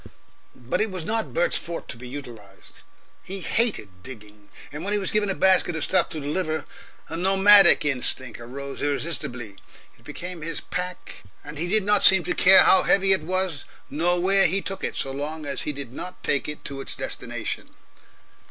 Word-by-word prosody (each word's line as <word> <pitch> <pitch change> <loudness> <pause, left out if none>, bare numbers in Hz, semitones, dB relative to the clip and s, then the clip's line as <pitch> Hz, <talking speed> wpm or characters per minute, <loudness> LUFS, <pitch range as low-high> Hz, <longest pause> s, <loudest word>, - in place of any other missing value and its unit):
But 125 - -3
it 220 - 0
was 185 -3 -6
not 225 +2 -1
Bert's - - 0
forte 170 0 -7
to - - -7
be 125 +2 -11
utilised. 115 -8 -11 0.4
He 195 +1 -7
hated 165 - -1
digging, 105 -3 -13 0.2
and 150 +2 -7
when 200 +2 -2
he - - +2
was 195 -2 -1
given 210 -1 0
a 190 - -1
basket 185 -2 +3
of 160 - -3
stuff 185 -2 +1
to 155 - -5
deliver, 155 +2 -3 0.4
a 160 - -6
nomadic 195 0 +6
instinct 130 -3 -1
arose 135 +4 -8
irresistibly, 140 -8 -3 0.4
it - - -24
became 175 -1 -7
his 165 0 -2
pack 180 0 -6 0.2
and 150 0 -9
he 170 - -1
did 215 +3 +1
not 205 +1 +3
seem 190 -2 +6
to - - -2
care 190 +1 +7
how 190 - +6
heavy 195 0 +4
it 190 - +3
was 185 -4 -1 0.3
nor 175 +3 +1
where 195 +2 +3
he 190 +5 +1
took 195 0 -5
it, - - -3
so 135 - -3
long 150 +3 -5
as 140 -1 -4
he - - -3
did 140 -4 -8
not 180 +6 -8
take 145 +1 0
it 150 - -8
to 140 -1 -5
its - - -4
destination. - - -6
165 Hz, 190 wpm, -24 LUFS, 140-190 Hz, 0.4 s, care